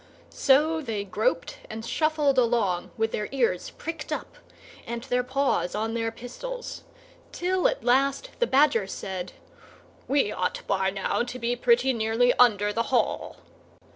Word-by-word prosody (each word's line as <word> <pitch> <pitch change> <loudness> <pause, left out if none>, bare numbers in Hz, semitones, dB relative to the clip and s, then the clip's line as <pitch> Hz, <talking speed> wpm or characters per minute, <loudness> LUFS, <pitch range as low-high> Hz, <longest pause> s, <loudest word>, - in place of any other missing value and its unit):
So 305 +4 +3
they 225 -7 -3
groped - - -1
and 225 +1 -6
shuffled 295 +1 +2
along, 225 -7 +1
with 225 0 0
their 210 - -3
ears 235 -10 0
pricked 330 0 -7
up - - -4 0.5
and 235 0 -4
their 250 -1 +1
paws 260 -7 0
on 220 +2 -1
their 225 -1 -1
pistols, 485 - -7 0.5
till 365 +1 +1
at - - -2
last 275 - +2
the 485 - +2
Badger 265 -7 +3
said, 185 -2 -5 0.7
"We 270 -6 +2
ought 180 0 -2
by 190 -1 +1
now 195 +3 -1
to 245 +1 -4
be 240 0 -1
pretty 245 +2 +3
nearly 230 +2 +2
under 210 -4 +4
the 230 +1 -1
Hall." 260 - 0
245 Hz, 145 wpm, -26 LUFS, 220-275 Hz, 0.7 s, under